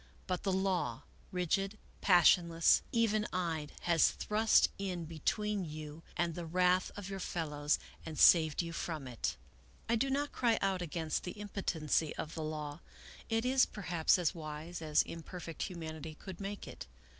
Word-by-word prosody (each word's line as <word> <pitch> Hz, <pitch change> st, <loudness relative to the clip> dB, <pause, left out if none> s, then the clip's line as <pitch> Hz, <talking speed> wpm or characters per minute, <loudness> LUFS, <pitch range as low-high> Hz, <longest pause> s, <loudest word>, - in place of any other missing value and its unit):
But 180 Hz, -1 st, -2 dB
the 195 Hz, -, 0 dB
law, 185 Hz, -10 st, 0 dB, 0.3 s
rigid, 195 Hz, +3 st, 0 dB, 0.2 s
passionless, 175 Hz, -3 st, +5 dB
even 215 Hz, -2 st, +2 dB
eyed, 165 Hz, -4 st, -2 dB
has 170 Hz, -2 st, +4 dB
thrust 215 Hz, +1 st, +3 dB
in 180 Hz, -4 st, -3 dB
between 200 Hz, +6 st, -1 dB
you 155 Hz, -1 st, -7 dB, 0.2 s
and 170 Hz, -1 st, +1 dB
the 175 Hz, -, -5 dB
wrath 180 Hz, +2 st, +3 dB
of 205 Hz, -2 st, -6 dB
your 195 Hz, -1 st, -5 dB
fellows 150 Hz, -5 st, -1 dB, 0.3 s
and 160 Hz, -2 st, -7 dB
saved 160 Hz, -1 st, +6 dB
you 170 Hz, 0 st, -5 dB
from 155 Hz, -5 st, -4 dB
it. 120 Hz, -, -3 dB, 0.5 s
I 230 Hz, -, +2 dB
do 270 Hz, +4 st, +1 dB
not 285 Hz, +2 st, 0 dB
cry 235 Hz, -3 st, +2 dB
out 195 Hz, -2 st, 0 dB
against 160 Hz, -2 st, -2 dB
the 180 Hz, -, -5 dB
impotency 165 Hz, -7 st, -1 dB
of 155 Hz, -, -5 dB
the 160 Hz, -, -4 dB
law; 155 Hz, -1 st, -4 dB, 0.5 s
it 225 Hz, +1 st, +1 dB
is 260 Hz, +1 st, +4 dB
perhaps 175 Hz, -5 st, +1 dB
as 175 Hz, -1 st, +1 dB
wise 160 Hz, +1 st, -6 dB
as 155 Hz, -2 st, +3 dB
imperfect 165 Hz, 0 st, -8 dB
humanity 160 Hz, -3 st, -5 dB
could 185 Hz, +2 st, -9 dB
make 200 Hz, +1 st, -5 dB
it. -, -, -9 dB
175 Hz, 155 wpm, -34 LUFS, 155-195 Hz, 0.5 s, saved